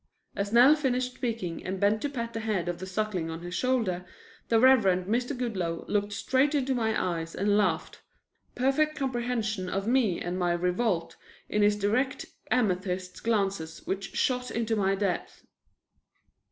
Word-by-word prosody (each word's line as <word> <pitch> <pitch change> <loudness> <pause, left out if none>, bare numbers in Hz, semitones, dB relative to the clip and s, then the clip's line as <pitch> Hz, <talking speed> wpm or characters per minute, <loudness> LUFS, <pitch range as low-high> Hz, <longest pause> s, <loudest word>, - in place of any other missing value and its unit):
As 200 0 -2
Nell 245 +5 +7
finished 255 -3 -1
speaking 225 -10 -3
and 190 +1 -4
bent 205 +2 +2
to 290 - -1
pat 235 -4 -4
the 225 - -3
head 215 -6 -1
of 175 -1 -3
the 185 - -6
Suckling 190 -4 -2
on 165 +1 -6
his 175 +1 -7
shoulder, 210 -5 0 0.5
the 225 - +4
Reverend 215 -8 +5
Mr. 245 +6 -1
Goodloe 185 -9 -2
looked 205 0 0
straight 265 +7 +1
into 270 -2 +1
my 220 -3 0
eyes 165 -2 -2
and 205 +1 +2
laughed, 185 -6 0 0.5
perfect 275 +5 +2
comprehension 240 -7 -2
of 195 +1 -2
me 230 -6 +2
and 180 +1 -3
my 175 -1 +2
revolt 180 +1 0 0.3
in 210 - +1
his 205 0 +4
direct 220 +7 0 0.2
amethyst 185 -5 -1
glances 195 -8 -1
which 195 0 -4
shot 250 -1 0
into 230 -1 -1
my 195 -2 +2
depths. 195 -2 -3
210 Hz, 160 wpm, -28 LUFS, 185-245 Hz, 0.5 s, Nell